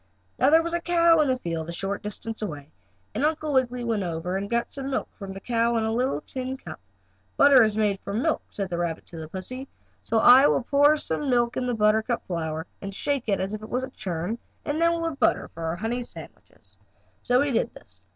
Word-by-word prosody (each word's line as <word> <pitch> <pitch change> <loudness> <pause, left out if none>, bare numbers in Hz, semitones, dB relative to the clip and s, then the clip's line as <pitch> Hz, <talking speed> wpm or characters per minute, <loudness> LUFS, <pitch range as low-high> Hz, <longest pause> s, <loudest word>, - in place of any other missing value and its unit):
Now - - +5
there 325 +2 +6
was 335 0 -3
a 345 - 0
cow 335 -1 +4
in 305 - +4
the 260 -1 +1
field 165 -7 -4
a - - -2
short 195 +3 -3
distance 220 +2 -5
away, 150 -7 -6 0.4
and - - -2
Uncle 305 -1 0
Wiggily 250 -2 +1
went 225 -3 0
over 175 0 -3
and 200 +1 -3
got 235 0 -1
some 275 -1 -4
milk 265 - -1
from 195 -2 -8
the 195 - -7
cow 235 +2 +1
in 225 - +1
a 220 0 0
little 240 - 0
tin 260 - -5
cup. - - -9 0.6
"Butter 280 -2 +7
is 215 -1 +1
made 205 -3 +1
from 205 +6 -3
milk," 320 - +1
said 195 -2 -4
the 170 - -2
rabbit 170 -2 -2
to 170 - -11
the 160 -1 -6
pussy. 250 - -7 0.3
"So 225 - -1
I 255 +5 +8
will - - +2
just 245 - -19
pour 290 +2 +5
some 295 -1 -3
milk 240 -1 +2
in 250 - -1
the 245 - 0
buttercup 220 +2 +1
flower, 160 -2 -3 0.2
and 195 -1 -6
shake 280 0 -1
it - - +3
just - - 0
as 195 +2 -4
if 215 - -5
it 215 - -9
was 250 +1 -1
a 260 - -6
churn, 185 +1 -4 0.3
and 300 +3 -1
then 335 0 +5
we'll 335 0 -1
have 300 -4 -5
butter 235 - +2
for 165 0 -7
our 160 +1 -1
honey 225 +6 -2
sandwiches." 240 - -12 0.4
So 245 +1 +3
he 290 - -1
did 235 - +1
this. - - -15
230 Hz, 245 wpm, -25 LUFS, 195-265 Hz, 0.6 s, I